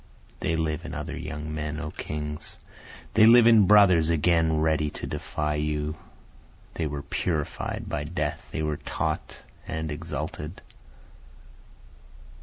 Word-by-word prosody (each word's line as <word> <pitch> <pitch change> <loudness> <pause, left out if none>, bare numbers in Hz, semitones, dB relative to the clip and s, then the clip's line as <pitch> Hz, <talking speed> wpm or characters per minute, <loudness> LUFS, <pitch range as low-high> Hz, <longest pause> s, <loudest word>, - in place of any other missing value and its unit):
They 80 - 0
live 80 0 -1
in 80 -2 -6
other 75 0 -4
young 75 +1 -5
men 75 0 -3
O 80 -2 -4
kings! 75 0 -5 0.6
They 110 +1 +7
live 120 0 +8
in 110 -4 +7
brothers 95 -6 +6
again 80 0 +3
ready 80 -1 +2
to - - -7
defy 75 0 -2
you, 75 0 -1 0.8
They 80 - -2
were 70 -1 -5
purified 80 -5 -2
by - - -3
death, - - -3
they 80 - -2
were 75 -1 -1
taught - - -3 0.2
and 80 0 -3
exalted. 75 +1 -5
80 Hz, 130 wpm, -26 LUFS, 75-85 Hz, 0.8 s, live